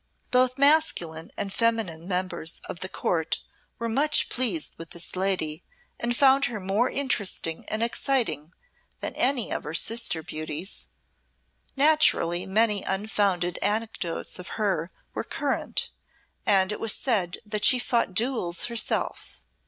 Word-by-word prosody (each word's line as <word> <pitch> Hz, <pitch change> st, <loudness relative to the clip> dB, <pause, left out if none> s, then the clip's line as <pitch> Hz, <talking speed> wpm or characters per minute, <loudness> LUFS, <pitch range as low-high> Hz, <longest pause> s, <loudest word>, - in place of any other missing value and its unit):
Both 255 Hz, 0 st, +3 dB
masculine 275 Hz, -, +3 dB
and 195 Hz, -1 st, -3 dB
feminine 220 Hz, -8 st, -1 dB
members 180 Hz, -3 st, -1 dB
of 170 Hz, -, -6 dB
the 185 Hz, -, -3 dB
Court 165 Hz, -4 st, -1 dB, 0.4 s
were 230 Hz, -, -3 dB
much 285 Hz, +7 st, +3 dB
pleased 220 Hz, -11 st, 0 dB
with 165 Hz, -1 st, -8 dB
this 170 Hz, +1 st, -4 dB
lady 185 Hz, -5 st, -1 dB, 0.4 s
and 240 Hz, 0 st, -1 dB
found 275 Hz, 0 st, +5 dB
her 235 Hz, -5 st, -4 dB
more 195 Hz, +6 st, 0 dB
interesting 205 Hz, -11 st, 0 dB
and 220 Hz, +1 st, -1 dB
exciting 235 Hz, -, 0 dB, 0.5 s
than -, -, -4 dB
any 255 Hz, -3 st, +2 dB
of -, -, -2 dB
her 155 Hz, +2 st, -5 dB
sister 225 Hz, -6 st, +1 dB
beauties. 155 Hz, +5 st, -5 dB, 0.9 s
Naturally 270 Hz, -, +3 dB
many 210 Hz, 0 st, +2 dB
unfounded 190 Hz, -3 st, 0 dB
anecdotes 210 Hz, -5 st, -2 dB
of 180 Hz, -, -8 dB
her 195 Hz, -6 st, -1 dB, 0.2 s
were -, -, -3 dB
current, -, -, -2 dB, 0.6 s
and 190 Hz, -1 st, +4 dB
it 210 Hz, -, -4 dB
was 225 Hz, -, +3 dB
said 195 Hz, -9 st, +1 dB
that 210 Hz, 0 st, -3 dB
she 255 Hz, -, +7 dB
fought 235 Hz, -5 st, 0 dB
duels 220 Hz, -6 st, +1 dB
herself. 235 Hz, -1 st, -2 dB
205 Hz, 135 wpm, -26 LUFS, 175-235 Hz, 0.9 s, she